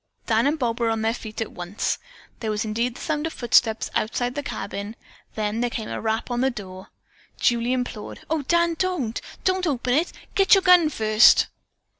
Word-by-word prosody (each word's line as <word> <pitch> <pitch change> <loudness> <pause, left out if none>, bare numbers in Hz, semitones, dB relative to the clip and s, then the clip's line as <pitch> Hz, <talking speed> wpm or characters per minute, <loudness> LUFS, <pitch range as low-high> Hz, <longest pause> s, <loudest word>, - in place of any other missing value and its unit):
Dan 225 +2 +2
and 300 +2 +1
Bob 240 -4 -1
were 230 -1 +1
on 225 -1 -1
their 225 +1 +1
feet 220 -2 -7
at 220 - -3
once. 175 +4 -3 0.4
There 220 - -3
was 215 +1 -1
indeed 230 +3 -1
the - - -10
sound 310 0 -1
of 325 - -7
footsteps 230 -2 +2
outside 245 +3 -1
the 290 - -3
cabin, 205 -5 -5 0.4
then 215 +1 -1
there 245 - +1
came 225 -2 -5
a - - -4
rap 220 +2 -2
on 240 0 0
the 265 - +3
door. 190 -5 -8 0.5
Julie 235 0 +2
implored: 250 -4 -4
"O 320 -1 0
Dan, 340 +4 +2
don't! 345 -12 -1 0.2
don't 370 -1 +1
open 250 -4 0
it! 320 +6 +1 0.2
Get 390 +1 +6
your 385 - +2
gun 355 -4 +6
first!" 215 -4 +5
240 Hz, 195 wpm, -24 LUFS, 220-295 Hz, 0.5 s, Get